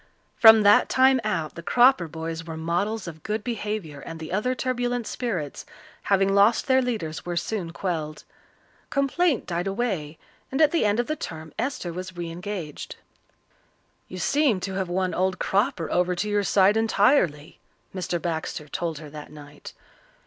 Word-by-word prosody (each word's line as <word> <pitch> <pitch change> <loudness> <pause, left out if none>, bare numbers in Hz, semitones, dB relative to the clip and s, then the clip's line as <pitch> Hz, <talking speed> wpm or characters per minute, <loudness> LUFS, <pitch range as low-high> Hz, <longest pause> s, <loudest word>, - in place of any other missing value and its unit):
From 220 -1 +8
that 205 0 +5
time 260 0 +4
out 165 -8 -2
the 170 - -8
Cropper 240 -1 +4
boys 160 +1 -5
were 160 -1 -7
models 185 +6 -2
of 160 -2 -8
good 215 +3 -3
behaviour 210 - -4
and 165 +3 -8
the 160 - -7
other 215 +7 0
turbulent 245 -2 -1
spirits, 185 - -4 0.4
having 195 0 +3
lost 205 +3 +4
their 260 -1 +4
leaders, 210 -11 -3
were 175 -1 -4
soon 175 -1 -3
quelled. 160 -4 -4 0.7
Complaint 275 +1 +1
died 175 +1 -2
away, 195 -8 -2 0.3
and 270 - -2
at 305 -2 +5
the 335 - +2
end 205 +2 +2
of 240 - +1
the 310 - -2
term 160 - -8
Esther 230 -8 -3
was 185 +1 -7
re 170 -1 -4
engaged. 175 -3 -6 1.1
"You 185 - -8
seem 275 0 +2
to 195 +1 -4
have 190 -1 -2
won 185 +1 -1
old 185 0 0
Cropper 200 - 0
over 180 0 +1
to 190 +4 -2
your 205 0 +1
side 200 +1 +4
entirely," 205 - +2 0.3
Mr. 180 -2 -2
Baxter 160 -3 -4
told 165 0 -3
her 155 -1 -9
that 150 -1 -9
night. 145 -1 -11
190 Hz, 165 wpm, -25 LUFS, 165-225 Hz, 1.1 s, From